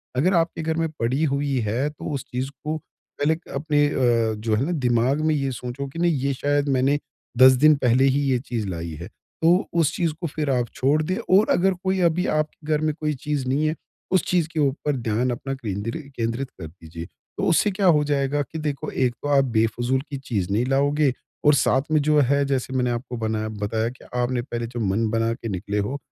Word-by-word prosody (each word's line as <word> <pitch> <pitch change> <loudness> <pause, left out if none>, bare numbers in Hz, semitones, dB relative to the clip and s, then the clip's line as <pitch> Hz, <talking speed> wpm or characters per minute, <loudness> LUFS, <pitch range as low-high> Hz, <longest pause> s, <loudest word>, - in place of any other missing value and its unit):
अगर 165 +9 +2
आपके 165 -1 +1
घर 160 0 -1
में 165 -1 0
पड़ी 130 +7 0
हुई 140 -1 0
है 120 +8 0
तो 150 - -11
उस 135 -2 -3
चीज़ 130 +2 -2
को 155 +1 -2 0.4
पहले 155 +2 +3
क 170 - -15
अपने 145 +1 +2
अ, 120 -5 +2
जो 110 +1 -1
है 120 +6 0
ना 170 - -2
दिमाग 125 -2 +1
में 155 - +3
ये 135 -2 -1
सोचो 125 +2 -5
कि 165 +5 -8
नहीं 175 0 +3
ये 140 +1 0
शायद 145 +2 0
मैंने 135 +2 +2 0.4
10 130 +1 +9
दिन 155 0 +8
पहले 130 -1 +3
ही 135 +1 +3
ये 125 - +3
चीज़ 120 -4 -4
लाई 85 -2 -4
है। 85 - -6
तो 170 - 0
उस 165 -1 +2
चीज़ 170 -4 0
को 170 - -1
फिर 150 -1 -3
आप 125 -2 +1
छोड़ 145 +4 +2
दें 185 +4 -1 0.2
और 215 - +3
अगर 190 +2 +3
कोई 190 0 +1
अभी 175 +1 +2
आपके 155 0 -3
घर 150 - +1
में 155 -1 +1
कोई 150 -1 0
चीज़ 140 -1 -3
नहीं 140 +4 +1
है, 155 - 0 0.4
उस 190 - +3
चीज़ 175 -3 +2
के 160 - -2
ऊपर 145 +1 0
ध्यान 115 +2 0
अपना 135 +3 -4
केंद्रि 115 - -4 0.2
केंद्रित 115 +3 -2
कर 80 - -5
दीजिए। 80 0 -10 0.3
तो - - -2
उससे 205 +5 +3
क्या 195 0 -1
हो 150 -3 +5
जाएगा 145 0 0
कि 155 +4 -6
देखो 145 -2 -3
एक 125 -2 0
तो - - -2
आप 135 - +5
बेफ़जूल 120 +2 +1
की 140 - -4
चीज 105 -9 -3
नहीं 110 +5 +1
लाओगे 140 +1 +2 0.3
और 150 - +7
साथ 130 -1 +3
में 155 -1 +4
जो 150 +1 +3
है 140 +1 +3
जैसे 135 -1 -2
मैंने 125 -1 +1
आपको 120 +1 -4
बनाया 110 -1 -2
बताया 110 +2 -2
कि 125 - -14
आपने 125 0 0
पहले 120 -2 -4
जो 120 +1 -6
मन 110 +1 0
बना 115 +1 +1
के 115 -1 -6
निकले 100 +2 -3
हो 105 +8 -2
135 Hz, 225 wpm, -23 LUFS, 120-150 Hz, 0.4 s, 10